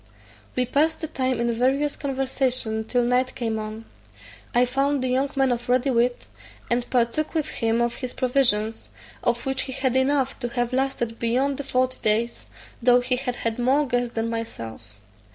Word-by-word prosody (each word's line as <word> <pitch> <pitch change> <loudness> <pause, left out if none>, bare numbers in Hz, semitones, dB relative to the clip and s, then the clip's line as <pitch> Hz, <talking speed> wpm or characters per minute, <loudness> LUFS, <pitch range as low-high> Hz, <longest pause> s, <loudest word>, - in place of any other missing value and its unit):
We 255 - +2
passed 310 +6 +1
the 315 - -2
time 260 -4 -1
in 235 0 +1
various 270 +5 +1
conversation 260 -5 0
till 245 +2 +1
night 250 +1 +1
came 225 -3 -2
on. 215 +1 -6 0.7
I 245 +1 +4
found 275 +2 0
the - - +1
young 265 +2 +1
man 270 -1 +3
of 240 0 -3
ready 255 +2 +3
wit, 245 0 +1 0.5
and 240 0 0
partook 250 +6 0
with 310 -2 +1
him 230 +1 +1
of 235 0 0
his 255 -2 -5
provisions, 240 -4 +1 0.3
of 240 0 0
which 270 0 0
he - - -3
had 260 -1 0
enough 270 0 +1
to 245 - -2
have 245 0 -1
lasted 255 -3 -1
beyond 260 +4 +1
the 285 - -4
forty 255 -1 0
days, 225 +2 +1 0.4
though 245 +1 +5
he 250 +1 +1
had 250 -1 -3
had 230 0 -2
more 270 +5 +3
guests 245 -2 -1
than 225 0 0
myself. 115 - -6
250 Hz, 180 wpm, -24 LUFS, 235-265 Hz, 0.7 s, though